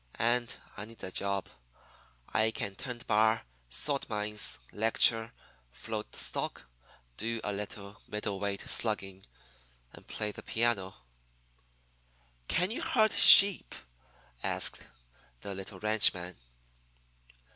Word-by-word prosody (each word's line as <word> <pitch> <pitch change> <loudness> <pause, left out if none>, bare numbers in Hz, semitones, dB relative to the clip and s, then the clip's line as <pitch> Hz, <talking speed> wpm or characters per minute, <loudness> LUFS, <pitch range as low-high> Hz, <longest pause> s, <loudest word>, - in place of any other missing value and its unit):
And 120 +1 0 0.3
I 105 - -7
need 115 +1 -17
a 95 - -6
job. 100 0 -4 0.8
I 110 0 0
can 105 -3 -5
tend 120 +3 -9
bar, 110 +1 +1 0.3
salt 140 - -3
mines, 105 -1 -2 0.2
lecture, 115 +1 +2 0.4
float 110 - -8
stock, - - -4 0.5
do 115 +1 -3
a 105 - -4
little 100 0 -8
middle 105 -2 -5
weight 100 0 -4
slugging, 95 -4 -4 0.7
and - - -16
play 105 -1 -5
the - - -11
piano.' 110 -5 -2 1.5
"'Can 180 +3 -1
you 230 - -5
herd 220 -3 +1
sheep?' 200 -2 +9 0.7
asks - - -1 0.5
the 100 - -7
little 95 0 -10
ranchman. 100 -4 +1
105 Hz, 110 wpm, -29 LUFS, 100-115 Hz, 1.5 s, sheep